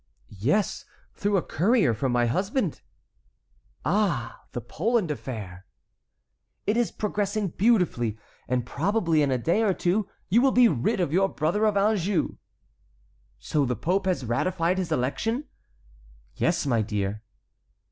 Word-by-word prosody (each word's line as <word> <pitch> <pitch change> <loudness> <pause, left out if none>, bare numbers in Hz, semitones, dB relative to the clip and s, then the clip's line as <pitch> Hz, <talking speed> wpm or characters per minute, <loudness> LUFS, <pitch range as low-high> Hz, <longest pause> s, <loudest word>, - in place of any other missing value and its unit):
"Yes, 150 - +1 0.3
through 205 0 0
a 175 - 0
courier 195 - +2
from 130 +4 -1
my 120 0 +2
husband." 190 - -1 1.0
"Ah! 185 - 0
the - - -4
Poland 180 - 0
affair?" 100 - -7 1.0
"It 210 - +1
is 240 -1 +1
progressing 205 -1 -1
beautifully, 175 - +1 0.3
and 125 -1 0
probably 165 - +1
in 145 - +2
a 130 - +1
day 170 - +1
or 205 -5 +2
two 195 +3 0 0.2
you 225 +6 +4
will 270 0 +3
be 250 -1 +7
rid 180 - 0
of 170 -5 0
your 195 +2 +3
brother 175 +9 0
of 210 -2 +2
Anjou." 200 -2 +1 1.0
"So 150 - 0
the 125 -2 0
pope 190 +7 0
has 180 -8 0
ratified 175 +9 0
his 180 -3 -3
election?" 220 - -1 0.9
"Yes, 170 -1 0
my 120 -5 +2
dear." 105 -1 -2
175 Hz, 135 wpm, -26 LUFS, 125-210 Hz, 1.0 s, be